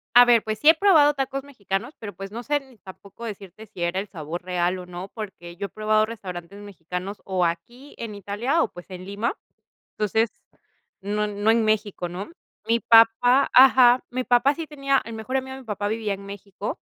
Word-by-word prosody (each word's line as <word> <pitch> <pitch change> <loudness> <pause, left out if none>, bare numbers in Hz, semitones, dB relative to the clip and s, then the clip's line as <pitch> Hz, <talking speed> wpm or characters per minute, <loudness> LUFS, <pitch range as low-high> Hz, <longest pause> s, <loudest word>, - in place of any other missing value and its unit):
A 245 0 +10
ver, 235 -2 +5
pues 215 -1 -3
sí 295 - +3
he 320 - +9
probado 315 -5 +5
tacos 270 0 -3
mexicanos 210 -2 -4
pero 205 -2 -7
pues 195 +1 -8
no 235 +2 -5
sé 290 +5 0
ni 265 -4 -19
tampoco 200 +4 -12
decirte 205 -1 -8
si 195 -4 -9
era 175 +2 0
el 205 - -7
sabor 165 -1 -6
real 180 0 -1
o 180 - -9
no, 180 +2 -7
porque 190 -6 -8
yo 200 - -3
he - - -14
probado 215 +1 +1
restaurantes 190 -4 -8
mexicanos 190 0 -7
o 185 -2 0
aquí 235 +12 -5
en 225 -2 -6
Italia 205 - -1
o, - - 0
pues, 175 +2 -13
en 185 0 -8
Lima. 200 - -2 0.6
Entonces 220 +2 +1 0.7
no 210 +2 -1
no 205 +1 +1
en 225 -1 +2
México, 210 -4 -1
¿no? 185 - -7 0.4
Mi 230 +1 +3
papá 230 +4 +5
ajá, 255 -1 +7
mi 255 +1 -2
papá 245 +3 +3
sí 325 0 -6
tenía 275 -2 0
el 230 - -7
mejor 225 +4 -3
amigo 265 0 -5
de 265 - -10
mi - - -17
papá 205 -2 -3
vivía 215 -1 -2
en 195 0 -9
México 200 - -7
215 Hz, 205 wpm, -24 LUFS, 195-245 Hz, 0.7 s, A